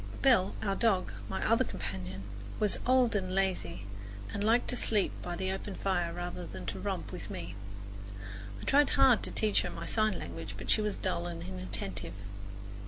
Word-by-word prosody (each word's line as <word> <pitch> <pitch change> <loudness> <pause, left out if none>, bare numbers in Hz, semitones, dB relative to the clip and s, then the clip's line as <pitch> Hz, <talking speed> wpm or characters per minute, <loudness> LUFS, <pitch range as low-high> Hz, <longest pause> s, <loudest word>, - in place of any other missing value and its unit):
Belle, 240 -9 +5
our 200 -2 +2
dog, 195 -4 +2 0.2
my 190 - -1
other 230 +3 +5
companion, 95 - -4 0.4
was 210 -2 +3
old 250 -3 +5
and 185 -2 0
lazy 175 - 0 0.5
and 205 - -1
liked 230 +3 +4
to - - +2
sleep 215 -4 +2
by 175 -1 -3
the 190 +1 -1
open 195 0 -4
fire 175 -3 +1
rather 175 +1 -4
than 95 -2 -7
to 95 +1 -3
romp - - -2
with - - -6
me. 85 +2 -5 1.1
I - - -8
tried 290 +1 +5
hard 265 -4 +7
to - - 0
teach 215 -2 +3
her - - -2
my - - -5
sign 215 -4 +2
language, 85 +3 -6
but 105 - -1
she - - +5
was 210 -1 0
dull 85 0 -1
and 85 -1 -5
inattentive. 95 +1 -2
185 Hz, 180 wpm, -32 LUFS, -, 1.1 s, hard